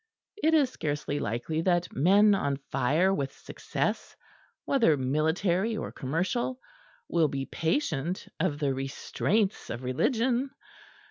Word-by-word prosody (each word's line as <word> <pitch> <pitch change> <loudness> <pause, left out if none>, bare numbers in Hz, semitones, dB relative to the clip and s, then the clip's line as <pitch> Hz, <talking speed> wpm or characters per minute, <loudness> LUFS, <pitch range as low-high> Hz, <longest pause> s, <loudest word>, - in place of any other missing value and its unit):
It 320 +1 +4
is 280 -5 +3
scarcely 145 - -2
likely 120 +9 -2
that 175 0 +1
men 200 +8 +5
on 140 -8 0
fire 150 +9 +2
with 140 -6 -2
success, - - -3 0.5
whether 225 - +3
military 170 - +1
or - - -4
commercial, 185 - -2 0.5
will 165 -2 +3
be 135 -1 -3
patient 165 - -1
of 160 -6 0
the 145 -2 0
restraints 185 +10 -1
of 120 +2 -5
religion. 240 - +1
165 Hz, 120 wpm, -28 LUFS, 140-210 Hz, 0.5 s, men